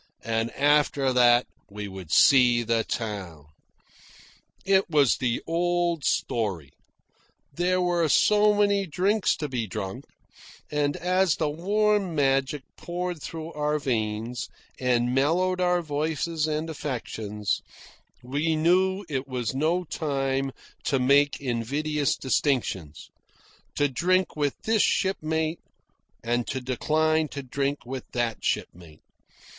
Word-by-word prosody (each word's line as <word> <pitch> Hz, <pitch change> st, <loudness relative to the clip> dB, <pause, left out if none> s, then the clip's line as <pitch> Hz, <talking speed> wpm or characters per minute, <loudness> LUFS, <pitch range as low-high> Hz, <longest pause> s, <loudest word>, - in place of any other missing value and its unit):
And 115 Hz, 0 st, 0 dB
after 145 Hz, -2 st, +2 dB
that 120 Hz, -1 st, +5 dB, 0.2 s
we 105 Hz, 0 st, -6 dB
would 95 Hz, -4 st, -9 dB
see 120 Hz, -, +5 dB
the 115 Hz, 0 st, +1 dB
town. 95 Hz, -11 st, -5 dB, 1.2 s
It 195 Hz, -1 st, +3 dB
was 145 Hz, -6 st, +3 dB
the 120 Hz, -2 st, -1 dB
old 175 Hz, -1 st, 0 dB
story. 95 Hz, -, -1 dB, 0.8 s
There 180 Hz, +4 st, +1 dB
were 175 Hz, -3 st, +1 dB
so 210 Hz, +4 st, +4 dB
many 200 Hz, -1 st, +2 dB
drinks 190 Hz, +6 st, +1 dB
to 150 Hz, -, -3 dB
be 125 Hz, -5 st, -3 dB
drunk, 105 Hz, +6 st, -5 dB, 0.7 s
and 145 Hz, -1 st, 0 dB
as 185 Hz, -1 st, +2 dB
the 150 Hz, -2 st, -1 dB
warm 200 Hz, +2 st, +1 dB
magic 135 Hz, 0 st, +1 dB
poured 175 Hz, -2 st, -4 dB
through 160 Hz, +2 st, -7 dB
our 150 Hz, 0 st, 0 dB
veins 115 Hz, -3 st, -2 dB, 0.3 s
and 125 Hz, -1 st, +1 dB
mellowed 180 Hz, +7 st, +1 dB
our 180 Hz, -1 st, +2 dB
voices 155 Hz, +1 st, -1 dB
and 155 Hz, +1 st, -2 dB
affections 110 Hz, -8 st, -3 dB, 0.6 s
we 145 Hz, +6 st, 0 dB
knew 185 Hz, +5 st, +2 dB
it 140 Hz, -3 st, -3 dB
was 125 Hz, -3 st, -3 dB
no 160 Hz, +6 st, +1 dB
time 135 Hz, -4 st, -2 dB, 0.3 s
to 140 Hz, -, +2 dB
make 140 Hz, +2 st, +3 dB
invidious 140 Hz, +4 st, -1 dB
distinctions 120 Hz, -, -1 dB, 0.6 s
to 145 Hz, -, +2 dB
drink 180 Hz, +7 st, +1 dB
with 145 Hz, -2 st, 0 dB
this 220 Hz, -1 st, +2 dB
shipmate 160 Hz, -3 st, 0 dB, 0.6 s
and 120 Hz, +1 st, -1 dB
to 130 Hz, -, -2 dB
decline 155 Hz, +5 st, +1 dB
to 140 Hz, -1 st, -7 dB
drink 140 Hz, +2 st, -2 dB
with 130 Hz, +1 st, -6 dB
that 120 Hz, -2 st, -2 dB
shipmate. 85 Hz, -3 st, -4 dB
145 Hz, 120 wpm, -26 LUFS, 120-170 Hz, 1.2 s, that